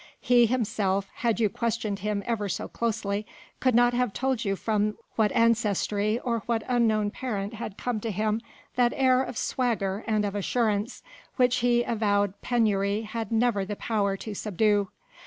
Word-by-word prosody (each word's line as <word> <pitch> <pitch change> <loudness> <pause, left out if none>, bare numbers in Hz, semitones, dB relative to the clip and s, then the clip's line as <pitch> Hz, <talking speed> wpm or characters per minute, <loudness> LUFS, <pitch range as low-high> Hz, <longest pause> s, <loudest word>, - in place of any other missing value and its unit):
He 240 -2 +4
himself, 205 -5 0
had 230 -2 0
you 220 - +4
questioned 215 -2 -2
him 205 0 -2
ever 215 -4 -1
so - - -3
closely, 215 -3 -2 0.4
could 255 -3 +2
not 245 0 +5
have 245 -4 0
told 260 -3 -1
you 195 -2 0
from 210 +1 0 0.2
what 215 -2 +2
ancestry 215 -2 +2
or 235 -2 -1
what 230 -2 0
unknown 220 -4 +2
parent 210 -5 -4
had 215 -3 -6
come 245 -3 -2
to 225 - -4
him 215 +2 0 0.3
that 245 -1 +3
air 260 -1 +4
of 255 -3 -4
swagger 215 -5 -1
and 215 -2 +1
of 200 - -2
assurance 210 +2 -1 0.3
which 250 -1 +3
his 240 0 +3
avowed 205 -3 +1
penury 210 -3 +1
had 225 +1 -5
never 225 -3 +2
the 205 +2 -4
power 200 -3 -1
to 215 +2 -6
subdue. 205 0 +1
220 Hz, 165 wpm, -27 LUFS, 205-235 Hz, 0.4 s, not